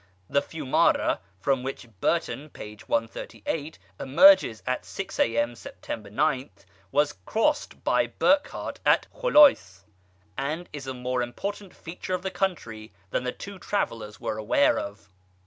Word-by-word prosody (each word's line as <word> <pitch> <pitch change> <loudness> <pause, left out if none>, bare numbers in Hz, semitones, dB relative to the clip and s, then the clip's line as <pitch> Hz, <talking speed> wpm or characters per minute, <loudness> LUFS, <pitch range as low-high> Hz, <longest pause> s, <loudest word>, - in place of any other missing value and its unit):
The 140 - +2
Fiumara, 145 -3 +1 0.2
from 135 +3 +1
which 135 -1 -5
Burton 155 - -1
(p. 105 -6 -9
138) 115 +6 -3 0.2
emerged 170 - +6
at 130 0 -1
six 195 - -6
A.M., 115 +1 +2
Sept. 105 -1 -8
9, 135 +2 +1 0.4
was 145 0 +2
crossed 295 +7 0
by - - +2
Burckhardt 285 +1 0
at - - +4
Kholayc, 290 - +5 0.5
and 155 +6 -3
is 140 -2 -7
a 130 - -4
more 125 0 -2
important 195 +11 -5
feature 180 +2 -5
of 180 - -6
the 190 - -2
country 155 - -3 0.2
than - - -1
the 125 - 0
two 200 +6 -9
travellers 115 - -3
were 110 - -3
aware 115 +6 +3
of. 100 0 -8
140 Hz, 135 wpm, -26 LUFS, 115-180 Hz, 0.5 s, emerged